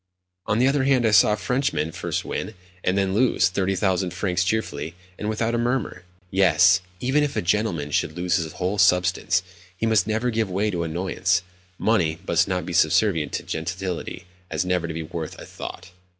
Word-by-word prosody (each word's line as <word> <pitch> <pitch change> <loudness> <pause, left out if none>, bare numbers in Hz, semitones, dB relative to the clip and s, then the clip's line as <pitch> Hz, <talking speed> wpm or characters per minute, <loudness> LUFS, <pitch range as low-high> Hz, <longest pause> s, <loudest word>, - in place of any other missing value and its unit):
On 105 - +1
the 125 +3 +4
other 135 -1 +2
hand, 130 -3 +3
I 110 - +3
saw 105 0 +6
a - - -1
Frenchman 115 - -1
first - - -3
win, 110 - -4 0.3
and 90 +2 +1
then 95 -1 +1
lose, 115 -4 +3
30,000 95 -1 0
francs 90 0 0
cheerfully, 85 -6 -2 0.2
and 105 - -2
without 115 +2 -1
a 120 - +1
murmur. 120 -7 -2 0.3
Yes; 90 0 +5 0.2
even 135 +6 +2
if 145 - -2
a - - +1
gentleman 85 -6 0
should 80 +2 -1
lose 90 0 +1
his 80 -3 -4
whole 95 +3 -2
substance, 90 0 +3 0.3
he 115 - -1
must 110 -2 +3
never 110 +3 0
give 110 -2 0
way 100 +3 0
to 90 -3 -2
annoyance. 85 +1 0 0.3
Money 85 -8 +1
must 85 +3 +2 0.2
be 90 - -5
so 80 - +4
subservient 80 -7 +1
to - - -2
gentility 90 +2 -4 0.2
as 80 +2 -1
never 90 -2 0
to 80 - -5
be 80 - -3
worth 80 0 -6
a - - -10
thought. 90 - -8
95 Hz, 190 wpm, -24 LUFS, 85-110 Hz, 0.3 s, saw